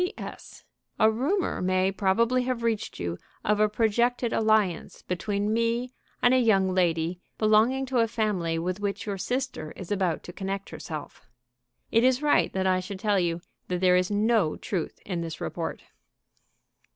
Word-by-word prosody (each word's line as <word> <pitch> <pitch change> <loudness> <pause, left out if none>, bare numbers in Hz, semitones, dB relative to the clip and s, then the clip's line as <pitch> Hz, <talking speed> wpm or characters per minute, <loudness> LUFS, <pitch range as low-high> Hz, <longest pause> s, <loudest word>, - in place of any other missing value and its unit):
"P.S. 360 +4 -7 0.4
A 220 -1 +6
rumor 295 - 0
may 185 +1 +2
probably 225 +6 +2
have 250 -2 -2
reached 225 -2 -1
you 85 0 -3 0.3
of 210 0 +2
a 215 0 +4
projected 235 +2 +1
alliance 215 -6 +1
between 200 +3 -1
me 230 +2 0 0.3
and 245 - +6
a 260 - +5
young 195 -6 +3
lady 170 -1 +1 0.2
belonging 220 +5 +3
to 255 -1 0
a 230 - +4
family 200 -7 -1
with 180 +3 -2
which 200 -1 -3
your 200 -2 -3
sister 250 - -3
is 185 -1 -9
about 185 -5 0
to 175 - -9
connect 195 +1 -4
herself. 155 -5 -8 0.6
It 230 +1 +4
is 260 +2 +3
right 295 - +3
that 190 0 -1
I 185 -1 +3
should 190 +2 -6
tell 205 -1 +2
you 170 -1 -1 0.3
that 180 -1 -1
there 180 0 +4
is 180 0 +2
no 210 -5 +2
truth 180 -6 -3
in 180 -4 -3
this 165 -1 -5
report." - - -4
205 Hz, 165 wpm, -27 LUFS, 180-230 Hz, 0.6 s, A